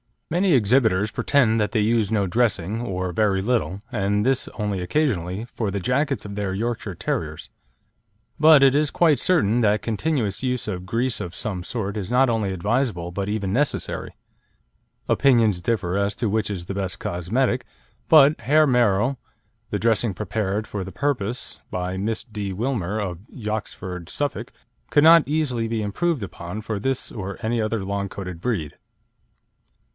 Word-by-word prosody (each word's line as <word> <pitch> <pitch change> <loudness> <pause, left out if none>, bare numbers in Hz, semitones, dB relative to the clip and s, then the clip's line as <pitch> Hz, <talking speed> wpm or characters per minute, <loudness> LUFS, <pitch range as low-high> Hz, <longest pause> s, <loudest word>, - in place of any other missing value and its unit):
Many 180 +2 +3
exhibitors 110 -4 +3
pretend 115 -4 +2
that 105 +1 0
they 110 - +2
use 110 -1 +2
no 105 -3 +1
dressing, 105 -1 0
or 95 -5 -3
very 95 +1 +1
little, 100 -5 -1
and 105 -2 0
this 135 0 +2
only 105 -3 -2
occasionally, 95 - -1
for 110 -4 -2
the 100 +1 -2
jackets 135 +6 0
of 100 - -6
their 100 -2 -2
Yorkshire 110 -2 -3
Terriers; 75 -1 -4 0.9
but 155 -2 +7
it 135 -1 +6
is 150 +1 +2
quite 155 -7 +3
certain 120 - +2
that 105 -1 +3
continuous 115 -2 -1
use 125 -3 -1
of 90 -2 -4
grease 115 +4 -1
of 90 -1 -6
some 95 -4 -4
sort 100 -3 -3
is 100 -2 -4
not 125 +1 +4
only 110 -4 0
advisable 100 -2 -1
but 100 +2 -3
even 100 -3 -2
necessary. 145 +4 -1 0.9
Opinions 115 -9 +3
differ 100 -3 -1
as 100 +1 0
to 115 - -1
which 110 +1 0
is 90 -4 -4
the 100 - -5
best 95 -2 -2
cosmetic, 120 +9 -1 0.4
but 150 -1 +7
Hairmero, 125 -3 +3 0.5
the - - -1
dressing 115 -2 +2
prepared 105 +2 -2
for 100 -3 -5
the 95 - -9
purpose 125 -5 -2
by 90 +1 -3
Miss 110 +3 -2
D. 105 -4 -5
Wilmer, 110 -2 -2
of 90 -5 -3
Yoxford, 105 -6 -5
Suffolk, 145 -1 -3 0.4
could 145 - +4
not 165 0 +7
easily 140 -7 0
be 110 -1 -2
improved 130 +6 -1
upon 90 +2 -6
for 110 -1 -3
this 135 +4 -2
or 100 -2 -6
any 115 0 0
other 110 -1 -1
long 100 0 -2
coated 90 -4 -7
breed. 85 - -3
110 Hz, 160 wpm, -23 LUFS, 95-125 Hz, 0.9 s, but